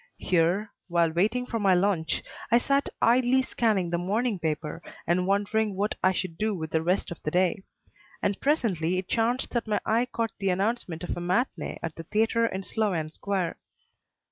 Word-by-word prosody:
Here, 185 +4 +1 0.2
while 170 -2 +2
waiting 215 +9 +1
for 230 -2 -3
my 195 -3 +4
lunch, 180 -4 +1 0.3
I 235 - +6
sat 275 +3 +1
idly 250 +2 +4
scanning 210 -9 0
the 170 - 0
morning 210 +3 0
paper 155 -1 -3 0.2
and 180 +2 +1
wondering 205 +1 +1
what 205 +3 0
I 185 - +5
should 185 -3 -4
do 215 -1 +1
with 160 -3 -5
the 160 - +2
rest 180 +3 0
of 170 - -7
the - - -2
day; 185 +5 +1 0.6
and 200 - -1
presently 190 - +1
it 185 -1 -3
chanced 240 +3 0
that 235 -2 -1
my 210 - +1
eye 230 +3 +2
caught 230 -1 -1
the 195 -1 0
announcement 190 -3 -1
of 175 - -4
a - - -3
matinée 185 +9 -1
at 165 -2 -3
the - - -5
theatre 225 +5 +2
in 190 -3 -4
Sloane 185 -8 -1
Square. 185 +1 -2
195 Hz, 185 wpm, -27 LUFS, 175-225 Hz, 0.6 s, I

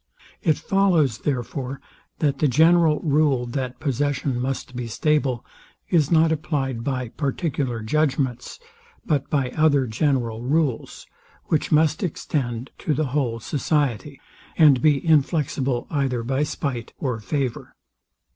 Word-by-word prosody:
It 155 -3 +2
follows 175 - +2
therefore, 135 0 -3 0.4
that 145 -3 0
the 150 - +3
general 160 +3 +4
rule, 145 -5 +2
that 125 +1 -4
possession 140 -2 -1
must 130 0 -4
be 120 -1 -4
stable, 135 0 0 0.4
is 155 -5 +3
not 160 -1 +4
applied 140 -7 -2
by 130 -2 -2
particular 135 -4 -2
judgments, 130 - -1 0.5
but 145 -4 0
by 135 -4 0
other 145 -3 +3
general 115 -2 -1
rules, 135 -1 -1 0.4
which 155 - 0
must 155 0 +3
extend 130 - -3
to 150 - -1
the 155 - 0
whole 125 -6 0
society, 140 +2 -1 0.4
and 145 -6 +6
be 150 0 +3
inflexible 140 -5 +1
either 135 -5 0
by 130 +4 -1
spite 135 -5 -3
or 125 -5 -2
favour. 130 +2 -3
140 Hz, 125 wpm, -23 LUFS, 125-155 Hz, 0.5 s, and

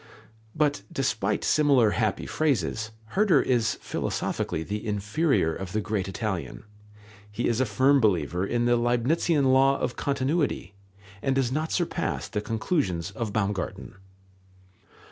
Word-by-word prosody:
But 150 -1 +1
despite 110 - -1
similar 140 -8 +4
happy 110 -3 -1
phrases, 110 - 0 0.2
Herder 205 -2 +3
is 120 -3 +1
philosophically 80 - -2
the 105 +4 -4
inferior 105 - +1
of 95 +1 -6
the 110 - +1
great 105 -2 -2
Italian. 95 -2 -4 0.7
He 110 +3 -1
is 120 +2 +1
a 130 - +1
firm 130 +7 +3
believer 90 -4 +1
in 120 +4 0
the 120 0 +3
Leibnitzian 130 +4 +2
law 135 +1 +4
of 125 - -3
continuity, 140 - -1 0.5
and 135 +1 0
does 130 -2 +1
not 155 +4 -2
surpass 175 - -1
the 105 - -3
conclusions 105 - -1
of 110 +1 -4
Baumgarten. 100 -2 -3
120 Hz, 130 wpm, -26 LUFS, 100-140 Hz, 0.7 s, similar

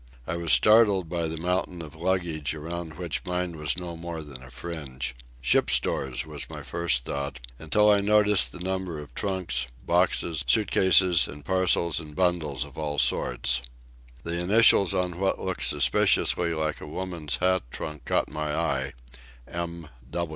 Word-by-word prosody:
I 80 - -3
was 85 -1 0
startled 105 -5 +5
by 85 -1 -2
the 80 +1 -4
mountain 90 +1 -1
of 75 -1 -11
luggage 85 -4 -1
around 80 +1 -6
which 75 -7 -4
mine 90 0 -2
was 75 +2 -1
no 90 -2 -5
more 85 -1 -6
than 70 -4 -11
a 65 - -12
fringe. 65 -3 -5 0.3
Ship's 60 - +4
stores, 65 +2 +1
was 75 -3 -7
my - - -8
first 85 -8 -1
thought, 70 -1 -4 0.2
until 105 +7 +2
I 100 -1 +4
noted 105 0 +3
the 90 - +2
number 95 -3 -2
of 75 -2 -10
trunks, 90 -11 -2 0.2
boxes, 85 -3 +1
suit 95 - +2
cases, 90 -2 +5
and 75 0 -10
parcels 90 -3 +2
and 75 -2 -10
bundles 85 -6 0
of 70 +1 -11
all 75 -1 -3
sorts. 65 0 +1 0.6
The 85 +1 -2
initials 100 -1 +5
on 90 -1 -1
what 95 0 +1
looked 95 -1 -3
suspiciously 85 -1 +2
like 80 0 -2
a - - -8
woman's 85 -2 -3
hat 95 0 +2
trunk 75 0 -7
caught - - +1
my 75 -1 -3
eye—"M. 65 +3 -5
85 Hz, 160 wpm, -26 LUFS, 75-90 Hz, 0.6 s, startled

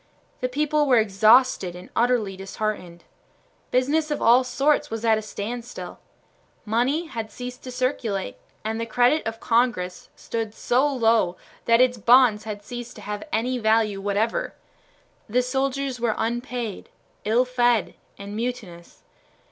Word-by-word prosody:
The 255 - -1
people 300 +2 +1
were 255 -2 +5
exhausted 215 -2 +4
and 180 - -12
utterly 235 -5 +1
disheartened. 195 -3 -5 0.7
Business 290 +5 +1
of 295 - -1
all 240 +3 +5
sorts 275 +4 +1
was 225 +1 -4
at 220 -1 +4
a - - -5
standstill. 230 +3 -6 0.7
Money 250 +10 +1
had 225 -8 -6
ceased 250 0 -8
to 255 - -6
circulate, 245 -6 -2 0.3
and 220 +1 -2
the 230 - -3
credit 245 +7 +3
of 225 0 -4
Congress 225 -7 0
stood 225 -2 -4
so 255 +4 +2
low 225 -9 +2 0.3
that 230 +1 +5
its 250 -2 +3
bonds 235 -1 +5
had 205 -2 -6
ceased 240 +2 -8
to 210 - -11
have 210 0 -5
any 250 +3 0
value 220 -3 +2
whatever. 205 +3 -1 0.7
The 250 +4 +2
soldiers 265 0 -1
were 230 -2 0
unpaid, 240 -1 -3 0.3
ill 230 +4 +2
fed, 240 -4 +1 0.2
and 200 +1 -8
mutinous. 220 -8 -6
235 Hz, 140 wpm, -24 LUFS, 215-250 Hz, 0.7 s, were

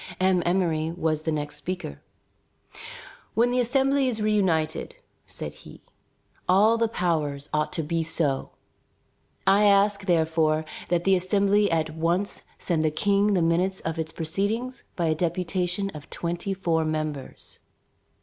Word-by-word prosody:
M. 185 -1 +3
Emmery 170 -3 +1
was 160 -2 -1
the 160 - -2
next 150 -1 -3
speaker. 175 - -5 1.3
"When 240 +2 +3
the 250 - +1
Assembly 270 +2 +2
is 235 -3 -1
reunited," 190 - 0 0.3
said - - -6
he, - - -14 0.7
"all 205 +5 +5
the 230 - +3
powers 155 -9 -1
ought 150 0 0
to 165 - -1
be 165 +2 -1
so. 155 -4 -1 1.0
I 200 +2 +5
ask, 200 0 +3
therefore, 160 -2 +2 0.2
that 175 0 +1
the 195 - +4
Assembly 200 +2 +2
at 160 -1 0
once 170 +5 -1 0.2
send 170 -3 0
the 155 - +2
King 200 +6 +2
the 175 - +2
minutes 180 +3 +1
of 165 0 -3
its 160 0 -3
proceedings 200 +11 -2
by 170 - 0
a 160 - +2
deputation 180 +3 -1
of 150 -4 -11
twenty 175 +3 -3
four 165 -4 +1
members." 155 -3 -4
175 Hz, 140 wpm, -26 LUFS, 160-200 Hz, 1.3 s, all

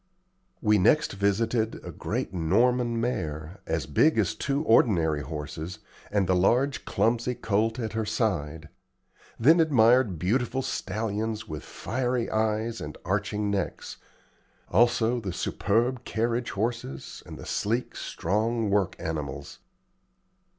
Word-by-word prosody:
We 105 -2 +4
next 150 +11 +3
visited 110 +3 +1
a - - -6
great - - -3
Norman 115 +7 +2
mare, 80 -7 -3
as 80 -4 -1
big 115 - +3
as 100 -6 +2
two 140 +2 -1
ordinary 85 - +3
horses, 75 +4 -6 0.3
and 100 -2 +1
the 95 - +2
large, 125 +10 +2
clumsy 120 +2 +1
colt 110 0 0
at 115 -3 -3
her 110 0 -1
side; 85 -9 -2 0.7
then 155 +9 +6
admired 125 - +4
beautiful 120 - 0
stallions 110 -3 -3
with 75 -5 -5
fiery 125 -1 -2
eyes 110 +1 0
and 75 0 -7
arching 105 +2 -1
necks; 95 -3 -3 0.7
also 120 +2 +3
the 100 -5 -4
superb 120 +8 0
carriage 120 +2 -1
horses, 110 - -4
and - - -8
the - - -9
sleek, 115 +4 -1
strong 110 +4 -1
work 100 -3 +1
animals. 75 -5 -5
110 Hz, 120 wpm, -27 LUFS, 95-120 Hz, 0.7 s, then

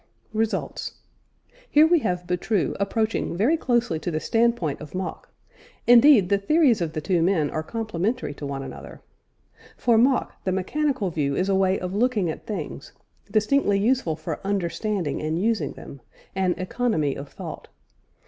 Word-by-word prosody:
RESULTS. 220 0 -2 0.7
Here 300 +1 +6
we 335 +1 +4
have 180 -8 -2
Boutroux 180 +2 0
approaching 215 -2 -1
very 240 - +3
closely 240 - 0
to 175 - -3
the 155 -2 -1
standpoint 225 -8 0
of 155 +3 -9
Mach; 185 0 -5 0.6
indeed 240 -5 +7
the 200 -1 +3
theories 260 - +3
of 160 -2 -2
the 155 - -3
two 175 +2 +1
men 165 -4 +2
are 155 - -2
complementary 215 - -2
to 145 - -8
one 135 -1 -4
another. 135 - -10 0.8
For 235 -2 +3
Mach, 255 +2 +1
the 185 - 0
mechanical 220 +2 -1
view 140 -3 -1
is 185 +5 0
a 195 - +3
way 190 0 +2
of 180 0 -4
looking 210 -5 +1
at - - -10
things, 160 -7 -6 0.4
distinctly 215 0 +2
useful 210 -6 +1
for 155 0 -5
understanding 195 -3 -2
and 155 +2 -1
using 205 -8 0
them 140 - -11 0.3
an 190 -2 +1
"economy 185 - 0
of 140 +1 -8
thought." - - -8
195 Hz, 160 wpm, -24 LUFS, 165-230 Hz, 0.8 s, indeed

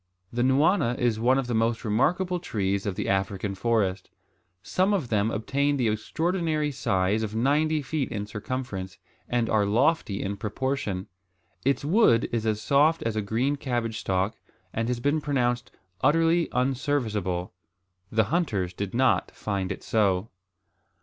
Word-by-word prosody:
The 120 - 0
nwana 130 0 +3
is 120 -3 +1
one 125 +3 +3
of 135 - 0
the 120 - -3
most 115 +1 0
remarkable 175 - +1
trees 100 - -1
of 100 - -2
the 105 - -3
African 95 +1 -1
forest. 100 -2 0 0.5
Some 190 - +2
of 150 -11 -2
them 105 0 +2
obtain 140 +6 0
the 120 -4 +2
extraordinary 155 - -1
size 105 -5 0
of 110 -1 -3
ninety 150 +5 +2
feet 135 0 -2
in 105 -2 -3
circumference, 105 -4 -5 0.3
and 120 -2 +1
are 110 -2 +2
lofty 110 0 +1
in 100 +1 -3
proportion. 105 -3 -2 0.6
Its 140 +1 +1
wood 150 - +4
is 115 -1 -1
as 105 -1 +1
soft 145 +8 +3
as 115 -1 -1
a 110 - 0
green 120 +8 0
cabbage 120 -5 -2
stalk, 95 +3 0 0.4
and 115 +1 -1
has 125 -1 -1
been 145 +5 +1
pronounced 125 -4 0 0.3
"utterly 165 +3 +3
unserviceable." 120 -9 -1 0.6
The 110 0 +3
hunters 105 - 0
did 100 +3 -4
not 130 +1 +3
find 100 -2 -3
it 95 - -6
so. 100 -1 +1
115 Hz, 150 wpm, -26 LUFS, 105-140 Hz, 0.6 s, wood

